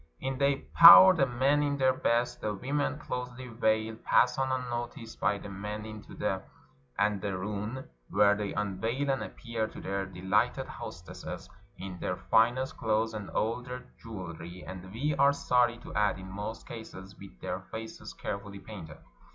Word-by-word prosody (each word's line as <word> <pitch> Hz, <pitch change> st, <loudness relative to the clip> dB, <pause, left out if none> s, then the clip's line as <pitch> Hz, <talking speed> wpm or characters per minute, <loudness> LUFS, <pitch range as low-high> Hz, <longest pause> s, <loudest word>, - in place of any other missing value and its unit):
" -, -, -41 dB
In 135 Hz, 0 st, -4 dB
they 140 Hz, 0 st, +1 dB
pour, 170 Hz, +3 st, +11 dB
the 140 Hz, -6 st, +2 dB
men 135 Hz, +4 st, +2 dB
in 145 Hz, -1 st, 0 dB
their 130 Hz, -1 st, +3 dB
best; 120 Hz, -2 st, 0 dB
the 105 Hz, -1 st, -2 dB
women, 145 Hz, +7 st, -1 dB
closely 125 Hz, -3 st, -5 dB
veiled, 110 Hz, -1 st, 0 dB
pass 125 Hz, +1 st, +3 dB
on 135 Hz, 0 st, +1 dB
unnoticed 120 Hz, -1 st, -4 dB
by 105 Hz, -, +2 dB
the 100 Hz, -, -9 dB
men 105 Hz, +2 st, -5 dB
into 110 Hz, -1 st, -9 dB
the -, -, -1 dB, 0.6 s
andcrun, 105 Hz, +4 st, -2 dB, 0.2 s
where 105 Hz, 0 st, +5 dB
they 105 Hz, -1 st, -3 dB
unveil 110 Hz, +7 st, -1 dB
and 135 Hz, -, -1 dB
appear 115 Hz, -3 st, -4 dB
to -, -, -10 dB
their 100 Hz, 0 st, -3 dB
de 90 Hz, -1 st, -11 dB
hghted 100 Hz, +3 st, +2 dB
hostesses 85 Hz, +1 st, -8 dB, 0.3 s
in 95 Hz, -1 st, -7 dB
their 90 Hz, -, -2 dB
finest 120 Hz, +4 st, +2 dB
clothes 110 Hz, 0 st, 0 dB
and 105 Hz, -3 st, -6 dB
all 115 Hz, +3 st, -1 dB
their 125 Hz, +1 st, -8 dB
jew 100 Hz, -7 st, -7 dB
elry; 85 Hz, +2 st, -9 dB
and, 95 Hz, 0 st, -8 dB
we 145 Hz, +8 st, -1 dB
are 140 Hz, +1 st, +6 dB
sorry 125 Hz, -3 st, +2 dB
to -, -, -11 dB
add, 105 Hz, -2 st, +2 dB
in 95 Hz, 0 st, -9 dB
most 105 Hz, +3 st, -6 dB
cases 100 Hz, -4 st, -9 dB
with 95 Hz, -11 st, -13 dB
their -, -, -3 dB
faces 110 Hz, 0 st, -8 dB
carefully 100 Hz, 0 st, -5 dB
painted. 95 Hz, -7 st, -10 dB
110 Hz, 170 wpm, -30 LUFS, 100-125 Hz, 0.6 s, pour